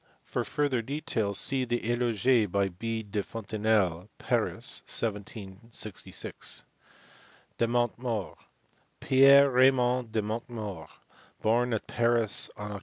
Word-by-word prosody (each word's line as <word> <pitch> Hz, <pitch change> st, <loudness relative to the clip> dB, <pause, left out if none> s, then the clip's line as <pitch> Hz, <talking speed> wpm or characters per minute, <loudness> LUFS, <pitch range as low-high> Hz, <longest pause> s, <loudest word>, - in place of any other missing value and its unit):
For -, -, -3 dB
further 140 Hz, -5 st, -1 dB
details 110 Hz, -6 st, -1 dB
see 135 Hz, -1 st, +3 dB
the 120 Hz, -2 st, -3 dB
eloge 120 Hz, -2 st, +1 dB
by 100 Hz, 0 st, +1 dB
B. 110 Hz, +5 st, -4 dB
de 105 Hz, 0 st, -3 dB
Fontenelle, 105 Hz, -4 st, -1 dB
Paris, -, -, 0 dB
1766. 105 Hz, -1 st, -2 dB, 1.0 s
De 115 Hz, -, +2 dB
Montmort, 120 Hz, -3 st, -2 dB, 0.6 s
Pierre 140 Hz, +1 st, +6 dB
Raymond 125 Hz, -2 st, +3 dB
de 110 Hz, -1 st, -1 dB
Montmort, 105 Hz, -6 st, -6 dB, 0.5 s
born 120 Hz, +3 st, +2 dB
at 110 Hz, -, -2 dB
Paris 115 Hz, -3 st, +2 dB
on 105 Hz, 0 st, -6 dB
Oct. 100 Hz, -, -6 dB
115 Hz, 110 wpm, -28 LUFS, 105-120 Hz, 1.0 s, Pierre